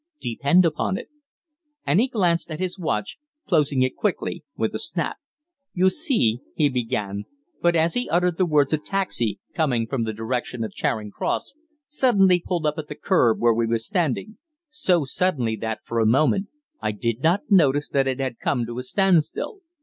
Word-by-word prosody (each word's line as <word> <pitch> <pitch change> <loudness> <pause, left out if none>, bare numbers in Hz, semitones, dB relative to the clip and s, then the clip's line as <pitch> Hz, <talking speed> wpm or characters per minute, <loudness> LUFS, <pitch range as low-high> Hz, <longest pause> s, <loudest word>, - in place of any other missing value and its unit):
Depend 140 +9 +3
upon 165 +4 0
it." - - -8 0.8
And 185 - +3
he 245 - +3
glanced 180 -10 +1
at 155 0 -5
his 185 +1 -3
watch, 180 - -2 0.3
closing 150 -8 +2
it 130 - -1
quickly 180 -4 -2
with 110 - -1
a 110 - -3
snap. 165 +7 -2 0.6
"You 185 +1 +4
see 220 - +1
" - - -35
he 150 -2 +3
began, 115 -6 -2 0.4
but 175 0 +3
as 165 +1 +2
he 245 0 -1
uttered 175 0 +1
the 185 - +3
words 150 -2 +3
a 155 - +2
taxi, 150 - -1
coming 130 -8 +1
from 120 0 -2
the 110 - -2
direction 115 +2 -3
of 110 - -5
Charing 105 -2 -2
Cross, - - -2 0.3
suddenly 200 -11 +3
pulled 175 -4 -2
up 150 +1 0
at 150 - -6
the - - -7
kerb 120 - +2
where 120 -1 +4
we 115 0 0
were 115 +1 +1
standing 175 - -2 0.3
so 185 - +1
suddenly 130 -7 0
that, 110 0 -4
for 115 - -2
a 110 - +3
moment, 155 - +3 0.3
I 105 - -1
did 115 +3 -2
not 180 - +1
notice 145 -6 +4
that 135 -1 +1
it 130 0 -1
had 130 -4 -3
come 120 -4 0
to 120 +1 -6
a - - -2
standstill. 180 - +1
150 Hz, 190 wpm, -23 LUFS, 120-185 Hz, 0.8 s, You